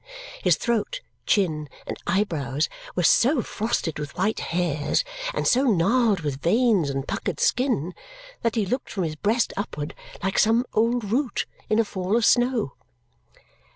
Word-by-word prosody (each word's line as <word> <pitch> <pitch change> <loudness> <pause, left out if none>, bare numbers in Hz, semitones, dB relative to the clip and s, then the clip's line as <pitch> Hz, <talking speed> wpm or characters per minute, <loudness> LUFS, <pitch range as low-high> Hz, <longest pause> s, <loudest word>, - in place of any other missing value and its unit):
His - - +4
throat, 235 - -1 0.3
chin, 155 -7 +1 0.2
and - - -4
eyebrows 155 - 0 0.3
were 180 - +1
so 245 - +4
frosted 205 -8 -2
with 145 +2 -6
white 195 +4 +1
hairs 165 - 0 0.3
and - - -2
so 260 +3 +4
gnarled 215 0 +3
with 140 -3 -3
veins 210 - +3
and 135 0 -3
puckered - - -3
skin 240 - +1 0.5
that 230 - 0
he 220 -3 +1
looked 250 +7 -2
from 190 - -2
his 155 -2 -2
breast 215 +8 +1
upward 150 -7 -4 0.3
like 195 0 +1
some 225 +3 +4
old 230 -1 +1
root 255 +2 0 0.2
in 215 - +3
a 230 - +3
fall 195 +1 -1
of 235 - +2
snow. 245 - +2
205 Hz, 155 wpm, -24 LUFS, 165-235 Hz, 0.5 s, His